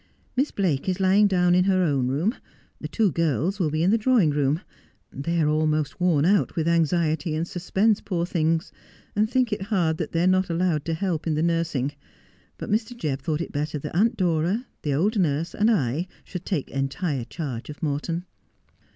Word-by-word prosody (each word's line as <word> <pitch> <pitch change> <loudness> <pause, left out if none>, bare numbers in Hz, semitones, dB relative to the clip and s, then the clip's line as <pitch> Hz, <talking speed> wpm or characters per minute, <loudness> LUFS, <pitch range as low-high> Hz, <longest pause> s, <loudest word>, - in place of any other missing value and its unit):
'Miss 270 +4 +2
Blake 180 -5 -1
is 185 +1 -1
lying 195 +2 +5
down 180 -2 +3
in 180 +1 +4
her 185 -1 +3
own 140 -6 +1
room 155 - 0 0.3
— - - -35
the - - -4
two 215 -5 +1
girls 165 - 0
will 165 -5 +1
be 155 +2 0
in 185 - +3
the 225 - +3
drawing 220 - +3
room 145 +1 +1 0.3
— - - -41
they 165 +5 -2
are 155 - +3
almost 155 +1 0
worn 165 -5 +3
out 200 +3 +2
with 160 -1 0
anxiety 165 -1 +1
and 165 +2 -2
suspense, 195 +5 +1
poor 175 -3 -2
things, 165 0 0 0.4
and 215 +1 +2
think 250 -3 +1
it 210 - -3
hard 185 -6 0
that - - -4
they 165 0 +1
are - - +3
not 185 0 +2
allowed 170 -3 0
to 165 - -1
help 170 -2 -2
in 155 - +1
the 155 - 0
nursing. 165 -5 0 0.7
But - - -6
Mr. 225 +3 -1
Jebb 145 - -2
thought 155 +1 -1
it - - -5
better 150 +1 -2
that 145 - -6
Aunt 225 +5 +2
Dora, 180 +6 +1 0.2
the 145 -2 -1
old 205 - +1
nurse, 160 -1 0
and 215 +2 +2
I 165 - +1 0.2
should 180 -1 -7
take 170 -9 -2
entire 135 0 -2
charge 135 -6 -6
of 150 +2 -9
Morton.' 160 +4 -2
170 Hz, 205 wpm, -25 LUFS, 155-190 Hz, 0.7 s, lying